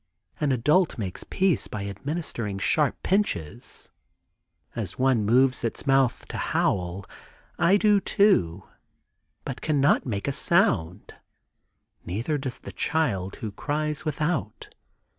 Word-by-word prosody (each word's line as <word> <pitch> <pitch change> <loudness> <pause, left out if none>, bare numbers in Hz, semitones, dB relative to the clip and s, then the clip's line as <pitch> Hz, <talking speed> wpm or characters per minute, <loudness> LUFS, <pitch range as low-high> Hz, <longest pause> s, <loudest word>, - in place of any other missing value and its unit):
An 145 -2 +1
adult 150 +8 +2
makes 95 -5 -4
peace 190 -4 +1
by 100 -2 -5
administering 110 - -4
sharp 145 +8 +1
pinches. 185 - -1 0.8
As 105 -6 -5
one 130 -4 +2
moves 125 +4 +3
its 115 - -3
mouth 135 -3 +2
to - - -5
howl, 90 +1 -1 0.5
I 175 +4 +5
do 210 -1 +4
too, 95 - +2 0.8
but - - -5
cannot 145 -3 +2
make 100 -1 -3
a - - +1
sound; 120 - +1 0.9
neither 115 - -2
does 130 -2 -5
the - - -10
child 105 - -1
who 110 - -6
cries 150 +6 -3
without. 155 -6 -2
135 Hz, 120 wpm, -26 LUFS, 100-155 Hz, 0.9 s, I